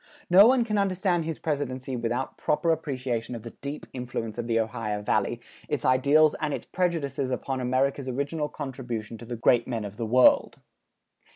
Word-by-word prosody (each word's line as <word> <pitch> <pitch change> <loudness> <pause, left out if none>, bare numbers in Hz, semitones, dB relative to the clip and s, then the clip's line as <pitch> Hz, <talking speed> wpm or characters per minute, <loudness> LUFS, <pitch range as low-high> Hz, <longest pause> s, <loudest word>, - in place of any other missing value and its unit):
No 195 +4 +9
one 255 -1 +4
can 210 -2 0
understand 185 -3 +1
his 160 -1 -3
presidency 130 -4 -3
without 120 +2 -2
proper 165 +2 +1
appreciation 130 -7 -2
of 115 - -8
the 115 - -8
deep 140 +2 -5
influence 120 -3 -5
of 120 - -3
the 115 -1 +2
Ohio 110 -2 -2
Valley, - - 0 0.3
its - - -2
ideals 145 +4 +5
and 150 -2 0
its - - -8
prejudices 145 -7 -1
upon 130 +1 -2
America's 130 +2 0
original 145 +4 -2
contribution 120 -5 -6
to 120 - -9
the 120 +1 -5
great 120 +1 +3
men 115 -4 -3
of 100 +1 -8
the 115 -2 -3
world. 125 +3 +4
130 Hz, 175 wpm, -27 LUFS, 120-150 Hz, 0.3 s, No